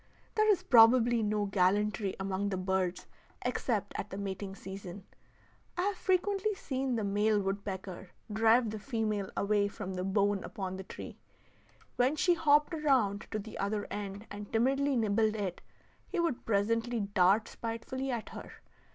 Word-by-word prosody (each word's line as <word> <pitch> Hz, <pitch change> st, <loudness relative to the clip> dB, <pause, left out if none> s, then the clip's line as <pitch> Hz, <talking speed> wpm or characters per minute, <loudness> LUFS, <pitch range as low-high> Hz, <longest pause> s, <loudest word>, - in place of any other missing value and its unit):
There 430 Hz, 0 st, +3 dB
is 395 Hz, -, +1 dB
probably 235 Hz, 0 st, +6 dB
no 210 Hz, -1 st, 0 dB
gallantry 200 Hz, +1 st, +1 dB
among 195 Hz, +1 st, -1 dB
the 190 Hz, -, -2 dB
birds 185 Hz, -1 st, -1 dB, 0.4 s
except 225 Hz, -4 st, -1 dB
at -, -, -4 dB
the 195 Hz, -, -6 dB
mating 195 Hz, 0 st, -5 dB
season. 190 Hz, -1 st, -8 dB, 0.7 s
I 355 Hz, -, +1 dB
have 405 Hz, +1 st, 0 dB
frequently 390 Hz, +3 st, +1 dB
seen 265 Hz, -7 st, -2 dB
the 220 Hz, -, -1 dB
male 205 Hz, +1 st, +2 dB
woodpecker 195 Hz, -2 st, -4 dB, 0.2 s
drive 225 Hz, +1 st, +4 dB
the 215 Hz, -, -5 dB
female 215 Hz, -4 st, -2 dB
away 200 Hz, 0 st, +2 dB
from 190 Hz, -1 st, -6 dB
the 180 Hz, 0 st, -3 dB
bone 200 Hz, +1 st, +1 dB
upon 190 Hz, -2 st, -5 dB
the 190 Hz, -, -6 dB
tree. -, -, -9 dB, 0.8 s
When 255 Hz, +4 st, +3 dB
she 350 Hz, +3 st, +3 dB
hopped 300 Hz, -1 st, +3 dB
around 255 Hz, -10 st, +1 dB
to 215 Hz, -, -2 dB
the 215 Hz, +1 st, -7 dB
other 205 Hz, +1 st, -1 dB
end 205 Hz, +1 st, -5 dB
and 205 Hz, 0 st, -8 dB
timidly 270 Hz, +4 st, +2 dB
nibbled 220 Hz, -1 st, +2 dB
it, 195 Hz, -4 st, -3 dB, 0.5 s
he 365 Hz, -, -3 dB
would 335 Hz, -7 st, -1 dB
presently 230 Hz, +3 st, +1 dB
dart 200 Hz, +1 st, +3 dB
spitefully 235 Hz, +4 st, -4 dB
at 235 Hz, -4 st, -3 dB
her. -, -, -9 dB
210 Hz, 155 wpm, -31 LUFS, 195-245 Hz, 0.8 s, probably